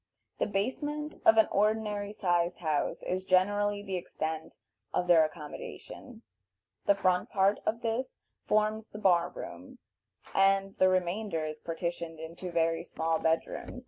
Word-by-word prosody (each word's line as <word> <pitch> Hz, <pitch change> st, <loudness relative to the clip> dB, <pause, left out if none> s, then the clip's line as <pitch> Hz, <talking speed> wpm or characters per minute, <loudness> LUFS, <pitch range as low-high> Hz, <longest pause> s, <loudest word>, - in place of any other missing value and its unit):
The -, -, +1 dB
basement 290 Hz, +9 st, -2 dB
of 225 Hz, -, +7 dB
an 220 Hz, -, +6 dB
ordinary 210 Hz, -1 st, +1 dB
sized 175 Hz, -4 st, +1 dB
house 155 Hz, -4 st, -1 dB
is 185 Hz, +1 st, -2 dB
generally 205 Hz, +2 st, +2 dB
the 190 Hz, -2 st, -3 dB
extent 160 Hz, -2 st, -4 dB, 0.4 s
of 180 Hz, -, +1 dB
their 170 Hz, -3 st, +6 dB
accommodation; 170 Hz, -, -8 dB, 0.6 s
the 200 Hz, -, +6 dB
front 185 Hz, -2 st, +1 dB
part 195 Hz, +1 st, +3 dB
of 230 Hz, +2 st, 0 dB
this 230 Hz, +3 st, -2 dB, 0.3 s
forms 215 Hz, +1 st, +1 dB
the -, -, -10 dB
bar 180 Hz, -5 st, +3 dB
room, 90 Hz, +1 st, -9 dB, 0.6 s
and 195 Hz, 0 st, +3 dB
the 185 Hz, -, +5 dB
remainder 185 Hz, -2 st, 0 dB
is 155 Hz, 0 st, -5 dB
partitioned 165 Hz, -1 st, -4 dB
into 165 Hz, +3 st, -7 dB
very 165 Hz, -1 st, +1 dB
small 160 Hz, 0 st, -1 dB
bed 160 Hz, 0 st, +2 dB
rooms. 250 Hz, -, -7 dB
185 Hz, 145 wpm, -30 LUFS, 165-210 Hz, 0.6 s, of